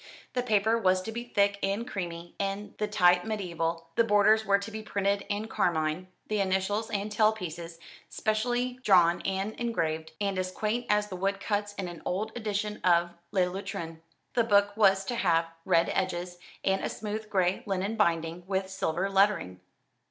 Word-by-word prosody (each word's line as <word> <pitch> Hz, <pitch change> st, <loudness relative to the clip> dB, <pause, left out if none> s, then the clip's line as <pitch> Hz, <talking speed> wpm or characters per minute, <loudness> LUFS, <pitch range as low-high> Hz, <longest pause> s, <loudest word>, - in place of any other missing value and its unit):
The 250 Hz, -, +1 dB
paper 220 Hz, -1 st, +2 dB
was 185 Hz, -3 st, +2 dB
to 225 Hz, -, -5 dB
be 235 Hz, +2 st, -4 dB
thick 200 Hz, -3 st, +1 dB
and 200 Hz, +5 st, -1 dB
creamy, 175 Hz, -3 st, -5 dB, 0.5 s
the 210 Hz, -, 0 dB
type 180 Hz, -4 st, +4 dB
mediaeval, 170 Hz, -6 st, -2 dB
the 230 Hz, -, +4 dB
borders 215 Hz, 0 st, +4 dB
were 200 Hz, 0 st, +5 dB
to 200 Hz, +3 st, -7 dB
be 220 Hz, 0 st, -5 dB
printed 200 Hz, -1 st, -1 dB
in 205 Hz, +2 st, -2 dB
carmine, 160 Hz, -3 st, 0 dB, 0.2 s
the 215 Hz, -1 st, 0 dB
initials 195 Hz, +3 st, 0 dB
and 205 Hz, +1 st, -2 dB
tail 215 Hz, 0 st, +4 dB
pieces 170 Hz, -5 st, -7 dB, 0.3 s
specially 245 Hz, +3 st, -1 dB
drawn 175 Hz, -7 st, +5 dB
and 195 Hz, +2 st, -1 dB
engraved, 160 Hz, -9 st, -2 dB
and 200 Hz, -2 st, -1 dB
as 185 Hz, 0 st, -1 dB
quaint 220 Hz, +5 st, -2 dB
as 210 Hz, 0 st, +2 dB
the 185 Hz, -, -5 dB
wood 195 Hz, +2 st, -1 dB
cuts 205 Hz, 0 st, -2 dB
in 190 Hz, -3 st, -4 dB
an 175 Hz, -2 st, -8 dB
old 210 Hz, +4 st, -2 dB
edition 210 Hz, -2 st, -3 dB
of 170 Hz, -1 st, +3 dB, 0.2 s
"Le 195 Hz, -2 st, +2 dB
Lutrin." 170 Hz, -3 st, -5 dB, 0.3 s
The 235 Hz, -, +3 dB
book 205 Hz, -2 st, +3 dB
was 195 Hz, -2 st, +4 dB
to 245 Hz, -, -2 dB
have 170 Hz, -7 st, +2 dB, 0.2 s
red 170 Hz, -2 st, +3 dB
edges, 180 Hz, -1 st, -2 dB, 0.2 s
and 195 Hz, 0 st, +1 dB
a -, -, -1 dB
smooth 215 Hz, 0 st, -5 dB
gray 185 Hz, -2 st, +1 dB
linen 195 Hz, +2 st, -1 dB
binding 170 Hz, -4 st, 0 dB
with 190 Hz, -1 st, -1 dB
silver 185 Hz, 0 st, -1 dB
lettering. 195 Hz, -, +2 dB
195 Hz, 175 wpm, -29 LUFS, 180-215 Hz, 0.5 s, were